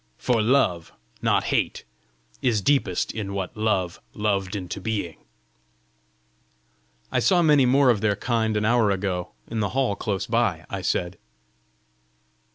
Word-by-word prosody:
for 120 -3 +1
love, 105 -8 +1 0.3
not - - +2
hate, - - 0 0.6
is 115 -4 +2
deepest 105 -5 +1
in 100 -3 -5
what 95 +2 -4
Love 100 -5 -1
'loved 100 -2 -1
into 90 -3 -5
being.'" 105 -8 -4 1.9
"I - - +2
saw 180 -3 +3
many 145 -5 +5
more 135 0 +5
of 105 -4 -1
their 105 -2 +2
kind 110 0 0
an 105 - 0
hour 115 -2 +3
ago, 95 -2 -2
in 115 - -4
the 105 -2 0
hall 130 -7 +1
close 100 -3 -2
by!" - - 0
I - - -3
said. 85 0 -2
105 Hz, 140 wpm, -24 LUFS, 95-120 Hz, 1.9 s, many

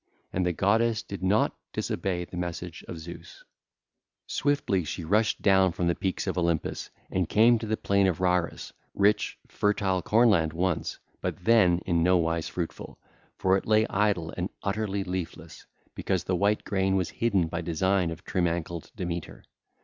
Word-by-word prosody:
And 90 0 +1
the - - +2
goddess 110 +5 +2
did 100 - -7
not 95 +4 +2 0.2
disobey 90 0 -2
the 90 - -11
message 90 -1 -5
of 85 - -6
Zeus; 85 +2 -10 0.8
swiftly 145 -11 0
she 85 - -5
rushed 105 +6 +1
down 95 -2 +5
from 90 - -2
the 85 - +3
peaks 95 +1 -2
of - - -1
Olympus 85 -2 -1 0.2
and 90 -3 0
came 115 +2 +5
to 110 - -5
the 110 +1 0
plain 100 -1 +2
of 90 -4 0
Rharus, 90 -2 0 0.2
rich, 100 +1 +2
fertile 100 -3 0
corn 115 +6 +4
land 80 -5 +2
once, 90 0 -1 0.2
but - - -4
then 95 -7 +5
in 85 -2 +1
nowise 85 -2 +2
fruitful, 85 -2 -5 0.4
for 95 0 +3
it - - -6
lay 110 0 +4
idle 95 -5 +1
and 90 +2 -2
utterly 100 -1 -1
leafless, 90 -2 -6 0.3
because 95 -3 -1
the 95 - 0
white 100 +3 +1
grain 95 -1 +1
was 90 -3 0
hidden 100 -7 +1
by 85 +1 -3
design 90 +2 +1
of 80 +2 -7
trim 90 -2 0
ankled 85 -1 -4
Demeter. 85 -2 -5
95 Hz, 165 wpm, -27 LUFS, 85-100 Hz, 0.8 s, down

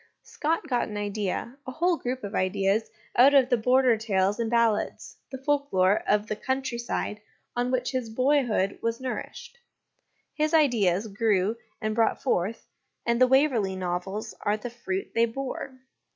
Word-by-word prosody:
Scott 320 +1 -2
got 245 -4 0
an 210 - -6
idea, 205 +4 -3
a - - -3
whole 350 +4 +2
group 255 -4 -4
of 200 0 -5
ideas, 195 +3 +1 0.3
out 270 +4 +6
of 260 -2 +5
the 250 - +4
Border 250 +1 +3
tales 205 -1 0
and 230 -1 0
ballads, 230 -2 0
the 265 - -5
folklore 260 -9 +2
of 210 0 +3
the 215 - -3
country 260 +1 -2
side, 210 -3 -3 0.3
on 245 +1 0
which 250 -1 0
his 255 -4 -2
boyhood 245 -5 +1
was 230 0 -1
nourished: 485 - -6 0.7
his 310 +1 +1
ideas 220 - +3
grew 205 -1 +1 0.2
and 215 0 -2
brought 225 0 +2
forth, 220 -3 -1 0.4
and 235 +1 +1
the 255 - +7
Waverley 250 -8 +2
Novels 185 +3 -4
are 205 +1 +1
the 235 +3 -7
fruit 195 -5 -4
they 230 0 +3
bore. 265 +2 -5
230 Hz, 160 wpm, -27 LUFS, 205-260 Hz, 0.7 s, the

